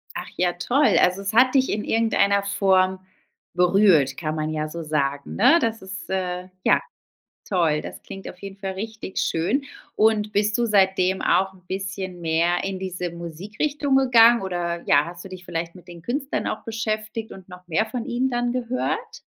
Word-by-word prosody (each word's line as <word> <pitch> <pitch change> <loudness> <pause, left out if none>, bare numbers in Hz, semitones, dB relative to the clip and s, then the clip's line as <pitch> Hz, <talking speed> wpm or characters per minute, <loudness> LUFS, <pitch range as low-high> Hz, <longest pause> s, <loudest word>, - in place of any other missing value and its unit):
Ach - - -5
ja, 180 -1 +1
toll. 265 +11 +2
Also 180 +2 +2
es 195 +2 -2
hat 255 +3 +5
dich 265 -1 +3
in 210 - -2
irgendeiner 200 -3 +2
Form 190 -1 +2 0.6
berührt, 180 -5 +4
kann 155 -2 -3
man 155 0 -2
ja 155 0 -2
so 170 +1 -6
sagen, 140 -2 -2
ne? 260 - +6
Das 225 -3 -1
ist, 190 -3 -8
äh, 180 -1 -2 0.2
ja, - - +4 0.7
toll. 165 -6 +1
Das 90 0 -9
klingt 195 - -8
auf 180 - -11
jeden 195 0 -9
Fall 195 -1 -4
richtig 215 0 -7
schön. 215 - 0 0.3
Und 215 -1 +2
bist 210 +2 +1
du 240 - +1
seitdem 190 -3 +2
auch 190 +1 +2
'n 180 -1 -21
bisschen 190 -2 -5
mehr 170 +2 +1
in 195 -1 -3
diese 180 -2 -4
Musikrichtung 210 - -2
gegangen 240 -3 +6
oder, 175 -2 -3
ja, 145 +1 +5
hast 170 +1 -9
du 195 - -9
dich 185 -1 -9
vielleicht 170 0 -4
mit 180 0 -15
den 170 -1 -11
Künstlern 270 - -2
auch 215 - -4
beschäftigt 220 0 -4
und 190 -1 -12
noch 180 0 -13
mehr 180 +6 +1
von 230 +2 -5
ihnen 255 +1 0
dann 240 0 -1
gehört? 250 0 -3
190 Hz, 185 wpm, -23 LUFS, 175-220 Hz, 0.7 s, ne